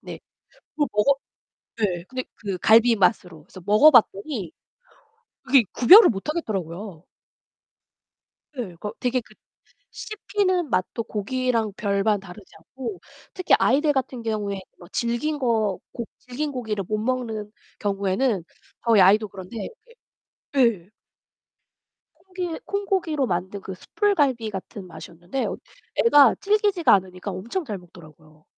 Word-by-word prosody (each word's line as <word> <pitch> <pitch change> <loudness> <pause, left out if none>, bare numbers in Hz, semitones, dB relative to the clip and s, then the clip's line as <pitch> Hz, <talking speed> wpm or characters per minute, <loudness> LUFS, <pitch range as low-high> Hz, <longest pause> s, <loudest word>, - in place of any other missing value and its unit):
네. - - -9 0.5
그걸 295 -2 0
먹었 240 +7 +3 0.6
네, 180 -5 -1
근데 255 +4 -5
그 195 -4 -5
갈비 230 +4 +5
맛으로 180 -6 0
그래서 185 - -14
먹어봤더니 215 - +4 0.9
그게 270 -2 +5
구별을 385 - +8
못하겠더라고요. 195 - -4 1.5
네, 225 -10 -5
거 205 +5 -6
되게 250 0 0
그 240 - -20 0.6
씹히는 400 -6 -2
맛도 185 +4 -1
고기랑 230 +1 -1
별반 205 0 0
다르지 195 +1 -13
않고 215 +3 -8 0.3
특히 370 -2 +2
아이들 295 +4 +3
같은 260 -2 -2
경우에 210 -3 -3 0.2
뭐 175 - -14
질긴 240 +6 -1
거 220 -7 0
고 235 - -5
질긴 285 +4 -5
고기를 220 -6 -3
못 215 +2 -2
먹는 225 -3 -3 0.3
경우에는 200 +1 0 0.4
저희 230 -4 +5
아이도 205 +3 +5
그런데 190 +3 -10
이게 - - -8 1.2
예. - - -28 1.4
콩고기, 360 -3 -4
콩고기로 380 -8 -1
만든 190 +1 -3
그 190 - -7
숯불갈비 280 - 0
같은 195 0 -8
맛이었는데 175 +7 -6 0.6
애가 290 - +7
질기지가 405 -4 +2
않으니까 185 0 -2
엄청 235 - -4
잘 210 -8 -5
먹더라고요. 155 -3 -18
220 Hz, 275 characters per minute, -24 LUFS, 195-270 Hz, 1.5 s, 구별을